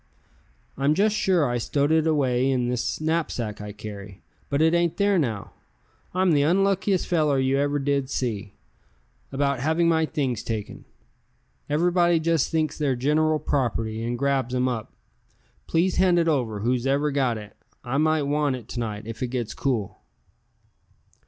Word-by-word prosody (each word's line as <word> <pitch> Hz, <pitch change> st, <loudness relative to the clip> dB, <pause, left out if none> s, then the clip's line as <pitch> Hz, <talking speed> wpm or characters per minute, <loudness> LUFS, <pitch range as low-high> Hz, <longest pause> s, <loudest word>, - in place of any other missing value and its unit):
"I'm 140 Hz, +2 st, +2 dB
just 210 Hz, +3 st, +2 dB
sure 185 Hz, -6 st, +2 dB
I 120 Hz, 0 st, -1 dB
stowed 145 Hz, +5 st, 0 dB
it 160 Hz, 0 st, +3 dB
away 135 Hz, -4 st, +2 dB
in 125 Hz, -2 st, 0 dB
this 125 Hz, -1 st, -2 dB
knapsack 155 Hz, -10 st, -2 dB
I 105 Hz, 0 st, -6 dB
carry, 100 Hz, -2 st, -9 dB, 0.3 s
but 140 Hz, -, 0 dB
it 160 Hz, +1 st, +4 dB
ain't 170 Hz, -1 st, +1 dB
there 200 Hz, -2 st, +3 dB
now. 110 Hz, -9 st, -3 dB, 0.6 s
I'm 185 Hz, 0 st, +2 dB
the 145 Hz, -2 st, +4 dB
unluckiest 195 Hz, +4 st, +2 dB
feller 155 Hz, -5 st, +2 dB
you 135 Hz, +1 st, +1 dB
ever 145 Hz, 0 st, +1 dB
did 140 Hz, -1 st, 0 dB
see, 105 Hz, -7 st, -3 dB, 0.8 s
about 140 Hz, -1 st, 0 dB
having 160 Hz, +5 st, +1 dB
my 160 Hz, -1 st, +2 dB
things 135 Hz, -9 st, -2 dB
taken. 110 Hz, -3 st, -5 dB, 0.8 s
Everybody 175 Hz, +2 st, +3 dB
just 165 Hz, -2 st, +1 dB
thinks 155 Hz, -2 st, -1 dB
they're 140 Hz, -4 st, +1 dB
general 155 Hz, +5 st, +2 dB
property, 115 Hz, -6 st, -1 dB
and 120 Hz, +1 st, -2 dB
grabs 135 Hz, -2 st, 0 dB
'em 125 Hz, 0 st, +1 dB
up. 115 Hz, -4 st, -3 dB, 0.8 s
Please 175 Hz, +3 st, +1 dB
hand 185 Hz, -2 st, +4 dB
it 170 Hz, -1 st, +2 dB
over, 120 Hz, -9 st, 0 dB
whoever's 135 Hz, +5 st, +1 dB
got 130 Hz, -5 st, +1 dB
it. 105 Hz, -1 st, -11 dB, 0.3 s
I 125 Hz, +2 st, -2 dB
might 155 Hz, -1 st, +2 dB
want 145 Hz, -1 st, 0 dB
it 120 Hz, -4 st, -10 dB
to 120 Hz, -, -5 dB
night, 105 Hz, -3 st, -4 dB
if 115 Hz, -1 st, -8 dB
it 125 Hz, -, 0 dB
gets 120 Hz, -3 st, -3 dB
cool." 120 Hz, -8 st, -2 dB
140 Hz, 160 wpm, -25 LUFS, 120-160 Hz, 0.8 s, it